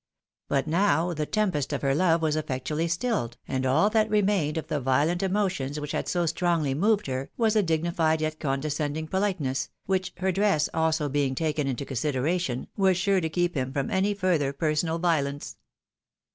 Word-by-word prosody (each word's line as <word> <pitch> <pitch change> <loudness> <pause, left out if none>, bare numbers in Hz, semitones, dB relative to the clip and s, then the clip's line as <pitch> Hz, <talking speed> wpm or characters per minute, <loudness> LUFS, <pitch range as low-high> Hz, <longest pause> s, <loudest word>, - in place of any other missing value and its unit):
But 135 -1 +1
now 175 0 +2
the 150 -2 -3
tempest 180 -11 0
of 145 - -3
her 135 -1 +2
love 165 +1 +2
was 155 -1 +1
effectually 150 +2 -2
stiUed, 170 - -1
and 130 0 -1
all 150 +10 +4
that 220 -1 +2
remained 195 -7 +1
of 160 - -3
the 150 - -2
violent 145 +7 +1
emotions 190 -8 -1
which 150 0 -5
had - - -2
so 175 -1 0
strongly 165 -4 0
moved 205 +8 +2
her, 130 0 -3
was 225 -2 +2
a 215 - +5
dignified 165 -2 +1
yet 155 0 -2
condescending 150 +2 -2
politeness, 180 -9 -1 0.2
which, 185 -1 -1
her 190 +1 0
dress 195 -5 +2
also 160 -2 +1
being 140 -1 0
taken 150 -1 -1
into 135 +1 -3
consideration, 140 +1 -1
was 190 -2 +3
sure 190 +1 +2
to 160 - -1
keep 175 +2 0
him 130 -2 -2
from 140 -1 -2
any 195 +2 +1
further 175 -8 +1
personal 155 +2 0
violence. 145 -5 -1
160 Hz, 175 wpm, -26 LUFS, 145-185 Hz, 0.2 s, a